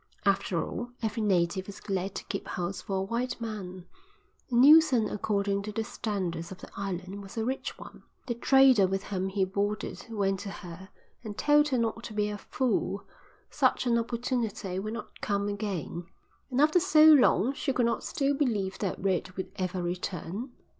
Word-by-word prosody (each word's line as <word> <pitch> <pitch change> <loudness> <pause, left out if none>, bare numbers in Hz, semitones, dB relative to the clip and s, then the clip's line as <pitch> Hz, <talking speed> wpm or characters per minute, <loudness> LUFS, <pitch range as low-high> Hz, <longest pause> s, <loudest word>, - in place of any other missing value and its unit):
After 195 -3 +1
all, 240 0 -5
every 220 +1 -1
native 185 -2 +1
was 200 - -8
glad 195 -1 -3
to - - -4
keep - - -5
house 180 +2 -3
for 195 - -4
a 190 - 0
white 240 +5 -2
man, 190 -6 -6 0.6
and 240 -2 +2
Neilson 290 -6 +7
according 200 -1 0
to 210 +1 -5
the 225 +2 -2
standards 185 -7 -3
of 190 - -7
the - - -12
island 195 0 -4
was 195 +3 -11
a 225 - 0
rich 260 +2 -3
one. - - -12 0.2
The 240 - -1
trader 255 -4 +5
with 195 +1 -2
whom 190 -2 -2
he 190 0 +1
boarded 205 +2 -3
went 195 -3 0
to 200 +1 -6
her 180 +1 -9 0.3
and 210 -2 -7
told 295 0 +4
her 265 -3 0
not 230 0 -1
to 215 - -7
be 210 0 +1
a 205 0 -5
fool; 205 -5 -1 0.5
such - - +2
an 235 -1 +3
opportunity 230 -5 -2
would 215 +3 -4
not 230 - -8
come 200 0 0
again, 195 -5 -4 0.4
and 255 0 -1
after 310 +4 +5
so 320 -4 +5
long 270 - +6
she 280 - -1
could 250 -2 +2
not 230 -1 0
still 280 0 0
believe 220 -10 -1
that 195 -3 -2
Red 185 -1 0
would 190 - -4
ever 185 -1 -2
return. 180 +6 -4
205 Hz, 185 wpm, -29 LUFS, 190-240 Hz, 0.6 s, Neilson